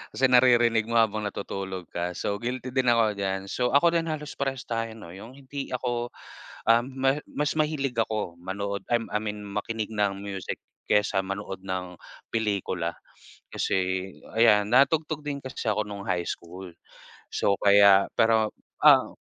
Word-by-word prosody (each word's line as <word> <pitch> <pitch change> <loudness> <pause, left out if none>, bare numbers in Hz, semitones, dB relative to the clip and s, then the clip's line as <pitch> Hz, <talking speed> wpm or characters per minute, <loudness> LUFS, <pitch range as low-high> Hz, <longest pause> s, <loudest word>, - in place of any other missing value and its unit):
kasi 130 -1 +3
naririnig 120 -3 +5
mo 115 - -2
habang 110 -2 +2
natutulog 95 -3 -6
ka, 85 0 -3
so 100 0 -2
guilty 125 +1 -4
din 130 -1 +1
ako 115 -2 +4
diyan. 95 0 -2
So 125 +2 0
ako 170 +4 +5
din 165 -1 0
halos 150 -2 -4
prarehas 135 -2 -2
tayo 115 -1 -3
'no, 95 -7 -11
'yung 110 +8 -11
hindi 140 0 -7
ako, 120 -1 -2 0.6
ah, 115 - +6
ma 135 +2 0
mas 150 0 -1
mahilig 145 -5 0
ako 105 -6 -2
manood, 100 +3 -4
ah, 120 - +4
I 105 - +1
mean 105 -1 -5
makinig 105 +2 -4
ng 100 -2 0
music 100 -2 -4 0.3
kesa 105 -2 +2
manood 100 0 -5
ng 90 -2 -4 0.3
pelikula. 100 -6 -1 0.6
Kasi 95 0 -1 0.3
ayan 105 -3 +5
natugtog 150 +4 +2
din 140 -1 -3
kasi 130 -1 -7
ako 105 0 +1
nung 100 -1 -7
high 90 -1 -1
school, 90 +2 -7 0.6
so 100 - +1
kaya 100 -1 +7
pero, 110 -1 +3 0.3
ah - - +6
110 Hz, 155 wpm, -26 LUFS, 100-125 Hz, 0.6 s, kaya